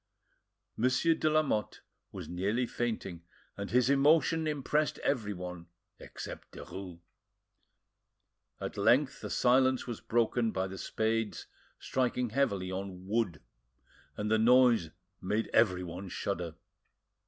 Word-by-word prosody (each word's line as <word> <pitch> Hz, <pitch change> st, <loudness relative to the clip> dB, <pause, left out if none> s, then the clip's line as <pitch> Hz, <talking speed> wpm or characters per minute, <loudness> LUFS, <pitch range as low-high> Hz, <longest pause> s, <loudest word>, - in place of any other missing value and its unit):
Monsieur 130 Hz, +8 st, +3 dB
de 155 Hz, -1 st, +1 dB
Lamotte 155 Hz, -9 st, 0 dB, 0.3 s
was -, -, -7 dB
nearly 100 Hz, +8 st, 0 dB
fainting, 110 Hz, -8 st, -3 dB, 0.3 s
and 100 Hz, 0 st, -5 dB
his 125 Hz, 0 st, +3 dB
emotion 155 Hz, +3 st, +4 dB
impressed 150 Hz, +1 st, 0 dB
everyone 90 Hz, -9 st, -2 dB, 0.3 s
except -, -, -9 dB
Derues. 90 Hz, -3 st, -8 dB, 1.6 s
At -, -, -5 dB
length -, -, +3 dB
the -, -, -5 dB
silence 130 Hz, +1 st, +3 dB
was 120 Hz, -3 st, -6 dB
broken 115 Hz, 0 st, +1 dB
by 95 Hz, -2 st, -1 dB
the 95 Hz, 0 st, -7 dB
spades 110 Hz, -1 st, -1 dB, 0.3 s
striking 125 Hz, -2 st, -1 dB
heavily 100 Hz, -8 st, 0 dB
on 95 Hz, -1 st, -6 dB
wood, 100 Hz, -6 st, -1 dB, 0.7 s
and 105 Hz, +1 st, -2 dB
the 110 Hz, -, +4 dB
noise 120 Hz, -6 st, +5 dB, 0.3 s
made 105 Hz, +4 st, -1 dB
everyone 90 Hz, -3 st, +1 dB
shudder. 85 Hz, -4 st, -3 dB
110 Hz, 110 wpm, -31 LUFS, 95-125 Hz, 1.6 s, noise